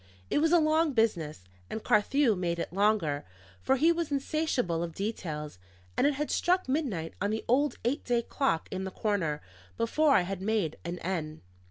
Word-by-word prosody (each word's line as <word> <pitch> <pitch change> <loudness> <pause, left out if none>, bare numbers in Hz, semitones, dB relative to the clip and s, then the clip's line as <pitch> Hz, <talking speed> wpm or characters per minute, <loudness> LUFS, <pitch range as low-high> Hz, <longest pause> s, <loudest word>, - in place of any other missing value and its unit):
It - - +3
was 320 +2 +3
a 350 - +7
long 310 -1 +3
business; 170 - 0 0.3
and 220 - -5
Carthew 230 +3 +3
made 175 -2 -1
it 170 - -4
longer, 195 -8 +2 0.4
for 265 - +3
he 320 +5 +4
was 335 -3 -2
insatiable 275 - 0
of 170 -1 -4
details; 155 - -4 0.4
and 280 - +3
it 290 - +1
had 295 +2 -2
struck 365 -1 +2
midnight 250 - -1
on 200 - +1
the 220 +1 -2
old 280 +5 +2
eight 270 +6 0
day 240 -1 +1
clock 265 - 0
in 190 0 -3
the 190 - -3
corner, 185 -7 -1 0.3
before 280 +5 +3
I - - +5
had 185 +1 -4
made 200 -6 0
an 175 +1 -4
end. 160 -4 -3
215 Hz, 185 wpm, -29 LUFS, 170-285 Hz, 0.4 s, a